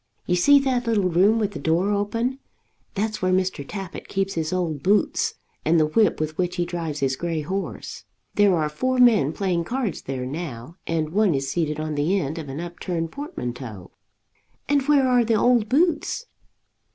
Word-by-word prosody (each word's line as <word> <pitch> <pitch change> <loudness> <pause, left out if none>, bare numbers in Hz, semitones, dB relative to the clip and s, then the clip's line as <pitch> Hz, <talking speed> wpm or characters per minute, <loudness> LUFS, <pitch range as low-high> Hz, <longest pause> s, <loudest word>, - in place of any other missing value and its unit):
You 180 - +1
see 285 +11 +6
that 250 -3 0
little 205 -5 +2
room 195 +6 +4
with 210 -2 0
the - - -7
door 170 +5 +1
open. 230 +6 -1 0.6
That's 215 +1 -2
where 185 0 +1
Mr. 185 -5 0
Tappitt 195 +4 -7
keeps 195 0 -1
his 160 -1 -2
old 170 -6 -1
boots 200 +7 +1 0.3
and 165 +1 +3
the 155 - +4
whip 205 +6 +2
with 155 +1 -3
which 180 -1 0
he 175 - 0
drives 165 -4 -4
his 135 -1 +1
grey 165 +1 -2
horse. 190 +6 -5 0.3
There 205 -3 +4
are 155 -1 +1
four 255 +13 -1
men 225 - +5
playing 175 -1 -1
cards 240 -3 -2
there 130 -1 -4
now, 145 +1 -6
and 160 -2 -1
one 200 -3 +3
is 135 0 -2
seated 155 -3 -1
on 155 0 -3
the 155 +7 +1
end 155 +1 -3
of 150 -3 -7
an 135 +3 -5
upturned 170 -1 -4
portmanteau." 125 - -6 0.8
"And 285 0 +3
where 285 -3 +4
are 250 -1 +4
the 225 0 +1
old 230 0 +3
boots?" 320 - +1
180 Hz, 185 wpm, -24 LUFS, 155-220 Hz, 0.8 s, see